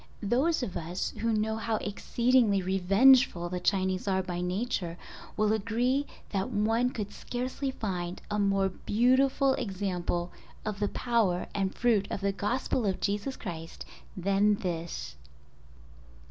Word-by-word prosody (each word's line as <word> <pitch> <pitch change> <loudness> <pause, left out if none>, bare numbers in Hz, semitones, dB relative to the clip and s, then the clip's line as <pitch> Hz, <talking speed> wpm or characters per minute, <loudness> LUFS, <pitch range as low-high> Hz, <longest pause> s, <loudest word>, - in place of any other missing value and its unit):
Those 260 +9 +2
of 195 - -4
us 175 +2 -3
who 230 0 +1
know 220 0 0
how 225 0 -1
exceedingly 230 +1 +2
revengeful 195 +1 +4
the 180 0 -3
Chinese 185 +1 0
are 190 -1 +1
by 175 -1 -4
nature 180 -2 -2 0.4
will 215 0 +3
agree 240 +6 0 0.2
that 195 +4 -1
one 225 +2 +1
could 210 -5 -5
scarcely 255 +3 -3
find 180 -8 -4
a 210 - 0
more 195 -1 +2
beautiful 260 +7 +2
example 185 -5 -2 0.3
of 210 -2 -3
the 205 - +1
power 225 -8 +1
and 195 -2 -1
fruit 225 -5 +2
of - - -4
the 200 0 +1
Gospel 225 +3 -1
of 190 - -1
Jesus 205 +7 -2
Christ 165 -5 -7 0.3
than 200 +3 +3
this. 170 - -4
205 Hz, 135 wpm, -29 LUFS, 185-235 Hz, 0.4 s, revengeful